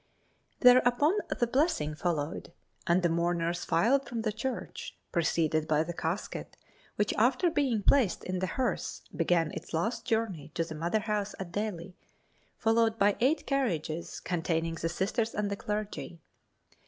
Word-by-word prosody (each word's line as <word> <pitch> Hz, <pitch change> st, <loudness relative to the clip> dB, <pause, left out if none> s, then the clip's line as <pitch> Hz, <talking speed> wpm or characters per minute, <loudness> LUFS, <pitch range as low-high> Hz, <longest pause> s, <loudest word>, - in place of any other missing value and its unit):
Thereupon 250 Hz, +8 st, +5 dB
the 240 Hz, -, +1 dB
blessing 240 Hz, -, +1 dB
followed, 155 Hz, 0 st, -2 dB, 0.4 s
and 175 Hz, +1 st, +3 dB
the -, -, +5 dB
mourners 170 Hz, +1 st, 0 dB
filed 240 Hz, +10 st, +2 dB
from 230 Hz, -2 st, -3 dB
the 215 Hz, -, 0 dB
church, 245 Hz, +5 st, -5 dB
preceded 160 Hz, -2 st, +1 dB
by 155 Hz, 0 st, +3 dB
the 175 Hz, +1 st, -5 dB
casket, 170 Hz, +4 st, -4 dB, 0.4 s
which 210 Hz, 0 st, +1 dB
after 255 Hz, +9 st, +3 dB
being 260 Hz, -9 st, +1 dB
placed 240 Hz, -8 st, +3 dB
in 185 Hz, 0 st, -2 dB
the 185 Hz, -, -1 dB
hearse, 245 Hz, -4 st, -2 dB
began 165 Hz, -1 st, +2 dB
its -, -, -6 dB
last 225 Hz, +8 st, -1 dB
journey 215 Hz, -, -1 dB
to 165 Hz, -, +1 dB
the 165 Hz, -1 st, -7 dB
mother 170 Hz, +7 st, 0 dB
house 210 Hz, -1 st, -2 dB
at 185 Hz, -3 st, -6 dB
Delhi, 190 Hz, -2 st, -4 dB, 0.6 s
followed 225 Hz, 0 st, +2 dB
by 205 Hz, -1 st, +4 dB
eight 275 Hz, +7 st, +2 dB
carriages 170 Hz, -, -1 dB
containing 165 Hz, -1 st, -1 dB
the 165 Hz, 0 st, -2 dB
Sisters 220 Hz, +6 st, -1 dB
and 205 Hz, -1 st, -1 dB
the -, -, 0 dB
clergy. 210 Hz, -4 st, -4 dB
200 Hz, 150 wpm, -30 LUFS, 165-230 Hz, 0.6 s, Thereupon